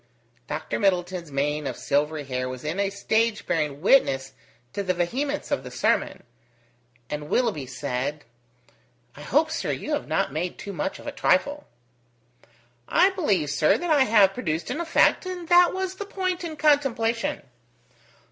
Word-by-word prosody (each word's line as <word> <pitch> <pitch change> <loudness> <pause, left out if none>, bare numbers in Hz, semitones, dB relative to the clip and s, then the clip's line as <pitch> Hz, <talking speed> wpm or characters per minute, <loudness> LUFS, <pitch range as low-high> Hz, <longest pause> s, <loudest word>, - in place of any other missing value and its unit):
Dr - - -3
Middleton's 180 -3 0
mane 145 +1 -1
of - - -4
silvery 150 +2 0
hair 130 -2 -3
was 130 -1 -7
in 155 +5 -3
a 200 -1 +1
state 220 +2 0
bearing 150 -3 -1
witness 135 - +3 0.4
to 200 - -2
the 185 -2 -1
vehemence 270 +12 -2
of 130 - 0
the 125 - -7
sermon, 125 - 0 0.8
and 150 +2 -5
Willoughby 215 - 0
said: 130 +3 -4 0.9
"I - - -11
hope, - - +1
sir, - - -2
you - - -4
have - - -2
not - - 0
made 170 +3 -3
too 200 - -7
much 185 +3 -3
of - - -13
a - - -3
trifle." 285 +10 +1 1.2
"I 375 +3 +5
believe, 200 - 0
sir, 150 +1 +3
that 350 -1 -2
I 285 -4 +5
have 205 -5 +5
produced 165 -8 -3
an 320 - -2
effect, 340 +2 +3
and 360 -2 -6
that 350 0 +6
was 375 0 -3
the 405 +2 -6
point 370 -3 -2
in 325 -2 -5
contemplation." 265 -7 +1
195 Hz, 160 wpm, -25 LUFS, -, 1.2 s, that